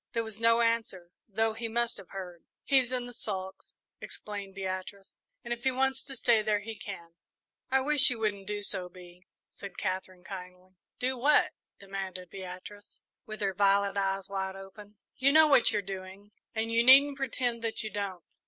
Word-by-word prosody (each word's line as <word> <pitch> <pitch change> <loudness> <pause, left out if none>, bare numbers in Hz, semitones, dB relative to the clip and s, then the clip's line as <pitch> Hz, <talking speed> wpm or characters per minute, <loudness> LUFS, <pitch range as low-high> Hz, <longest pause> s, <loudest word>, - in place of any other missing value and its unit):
There 230 -1 +1
was 220 0 -8
no 230 +1 +5
answer, 225 -7 0 0.2
though 220 +1 +1
he 230 +1 -4
must 235 +1 0
have 195 -3 -12
heard. 180 -3 -8 0.2
"He's 260 -3 +3
in 250 -1 -2
the 245 - -9
sulks," 190 -4 -6 0.2
explained 200 -2 -7
Beatrice, 190 +1 -5 0.3
"and 240 - -2
if 235 - -8
he 265 - +4
wants 265 +1 +1
to 270 - -8
stay 230 -2 +4
there, 210 -1 +1
he 225 +1 -6
can." 180 -4 -8 0.6
"I 265 0 +3
wish 295 +1 +4
you 250 - -1
wouldn't 205 -3 -2
do 205 0 -3
so, 185 -3 -2
Bee," 180 0 -14 0.3
said 200 - -10
Katherine, 185 -1 -3
kindly. 185 -1 -9 0.3
"Do 255 0 -1
what?" 295 +4 +4 0.3
demanded 190 -2 -6
Beatrice, 190 +2 -10 0.2
with 215 0 -7
her 195 -1 +1
violet 200 +1 +3
eyes 195 -1 0
wide 190 -1 -3
open. 195 +2 -11 0.2
"You 275 0 +4
know 315 +2 +8
what 275 -5 +5
you're 210 -2 0
doing, 195 +1 -8 0.2
and 225 +1 -1
you 230 +1 +4
needn't 275 +3 +7
pretend 245 -3 -1
that 225 -1 0
you 215 - -4
don't." 195 -4 -4
205 Hz, 180 wpm, -30 LUFS, 190-235 Hz, 0.6 s, know